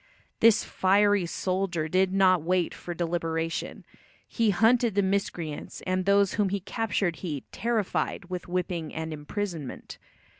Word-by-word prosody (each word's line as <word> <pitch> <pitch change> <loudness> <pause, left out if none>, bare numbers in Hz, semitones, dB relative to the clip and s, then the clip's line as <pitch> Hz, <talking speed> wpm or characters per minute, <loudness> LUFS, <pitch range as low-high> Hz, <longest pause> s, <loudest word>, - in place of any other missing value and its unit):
This 225 -1 +5
fiery 200 -1 +3
soldier 185 -3 -1
did 185 +3 +2
not 185 -2 +4
wait 180 +1 0
for 175 - -7
deliberation. 165 -1 -2 0.4
He 230 -2 +1
hunted 225 +3 +3
the 200 - +3
miscreants, 185 -5 -3
and 185 0 0
those 200 -1 +4
whom 205 -2 +1
he 200 +1 -1
captured 200 -4 -1
he 150 -7 -4
"terrified" 220 -5 -1
with 180 0 -6
whipping 175 -3 -2
and 160 0 -4
imprisonment. 155 -1 -5
185 Hz, 135 wpm, -27 LUFS, 170-200 Hz, 0.4 s, This